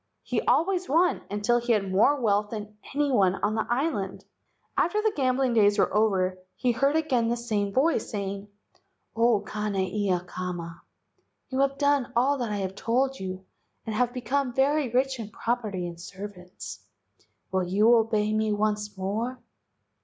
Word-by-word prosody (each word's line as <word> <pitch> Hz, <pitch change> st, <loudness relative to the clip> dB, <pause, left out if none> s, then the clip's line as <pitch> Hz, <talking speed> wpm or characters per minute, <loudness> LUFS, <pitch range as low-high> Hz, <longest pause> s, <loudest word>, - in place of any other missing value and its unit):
He -, -, -1 dB
always 365 Hz, +1 st, +1 dB
won 340 Hz, +5 st, +3 dB
until 210 Hz, +4 st, +1 dB
he 240 Hz, 0 st, +1 dB
had 195 Hz, -3 st, 0 dB
more 230 Hz, +10 st, +4 dB
wealth 210 Hz, -3 st, +1 dB
than 210 Hz, -1 st, -7 dB, 0.2 s
any 290 Hz, -1 st, +2 dB
one 195 Hz, -6 st, +3 dB
on 205 Hz, +2 st, -1 dB
the 220 Hz, -, -1 dB
island. 240 Hz, -, -1 dB, 0.5 s
After 415 Hz, +6 st, +2 dB
the 430 Hz, 0 st, +1 dB
gambling 260 Hz, -2 st, +1 dB
days 205 Hz, -2 st, +4 dB
were 200 Hz, -, +2 dB
over 190 Hz, -4 st, +2 dB, 0.2 s
he 245 Hz, +5 st, +1 dB
heard 275 Hz, +5 st, +1 dB
again 270 Hz, -8 st, +1 dB
the 235 Hz, +1 st, 0 dB
same 210 Hz, -4 st, -1 dB
voice 290 Hz, +10 st, +1 dB
saying: 200 Hz, -1 st, -4 dB, 0.7 s
"O 230 Hz, -2 st, +3 dB
Kane 210 Hz, 0 st, -3 dB
ia 190 Hz, -1 st, 0 dB
kama, 175 Hz, -2 st, -6 dB, 0.7 s
you 260 Hz, -, -2 dB
have 275 Hz, 0 st, +2 dB
done 285 Hz, -3 st, +2 dB
all 270 Hz, +4 st, +3 dB
that 235 Hz, -3 st, -2 dB
I 200 Hz, -2 st, -1 dB
told 255 Hz, +7 st, 0 dB
you 185 Hz, 0 st, -6 dB, 0.4 s
and 220 Hz, -, -3 dB
have 245 Hz, +2 st, +1 dB
become 255 Hz, 0 st, -1 dB
very 280 Hz, 0 st, +2 dB
rich 260 Hz, +2 st, +1 dB
in 215 Hz, -2 st, -5 dB
property 215 Hz, -5 st, -2 dB
and 170 Hz, -1 st, -7 dB
servants. 185 Hz, 0 st, -9 dB, 0.7 s
Will 190 Hz, -1 st, +1 dB
you 205 Hz, +6 st, +4 dB
obey 215 Hz, -2 st, +1 dB, 0.2 s
once 210 Hz, -1 st, -1 dB
more?" 220 Hz, +7 st, -2 dB
220 Hz, 160 wpm, -27 LUFS, 200-260 Hz, 0.7 s, more